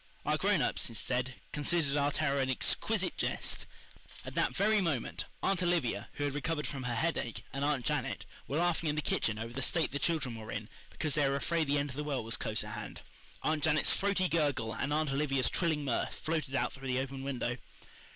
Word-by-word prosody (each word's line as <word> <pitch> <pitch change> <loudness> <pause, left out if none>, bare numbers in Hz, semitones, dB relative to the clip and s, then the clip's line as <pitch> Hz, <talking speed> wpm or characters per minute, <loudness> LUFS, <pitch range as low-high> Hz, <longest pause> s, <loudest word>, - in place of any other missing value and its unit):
Our - - +3
grown - - +3
ups, - - 0
instead, 125 +3 -2 0.2
considered 150 -1 +1
our 145 0 +3
terror 140 -1 +1
an 130 -1 +1
exquisite 130 - +2
jest. - - -1 0.6
At - - -6
that - - +1
very 210 +1 +4
moment, 155 -10 0 0.2
Aunt 195 -2 +2
Olivia, 160 - +1
who 145 - -3
had 145 -1 0
recovered 150 +1 -1
from 135 - -3
her 120 -1 -1
headache, 150 -4 -1
and 135 +1 -2
Aunt 145 -4 +1
Janet - - -1 0.2
were 145 - -1
laughing 170 -1 +2
in 150 - +1
the 150 - -1
kitchen 110 -4 +1
over 115 +2 -5
the 135 - -3
state 165 +5 +1
the 145 - -2
children 150 -8 0
were 110 -1 -7
in 105 +1 -4 0.2
because 155 -3 -2
they 145 -3 +3
were 140 - +1
afraid 160 +2 +1
the 145 +1 +3
end 145 -1 0
of - - -9
the 150 - -2
world 135 -6 -2
was 115 - +1
close - - 0
at - - -7
hand. - - -6 0.4
Aunt 155 -1 +1
Janet's 155 -2 +4
throaty 200 -2 +2
gurgle 140 -9 +1
and 145 - -2
Aunt 150 -1 +1
Olivia's 135 -2 +1
trilling 155 -4 +1
mirth 130 - 0
floated 155 -4 -2
out - - +1
through 135 0 -7
the 130 -1 +1
open 135 0 -3
window. 125 -3 -2
145 Hz, 215 wpm, -33 LUFS, 130-155 Hz, 0.6 s, very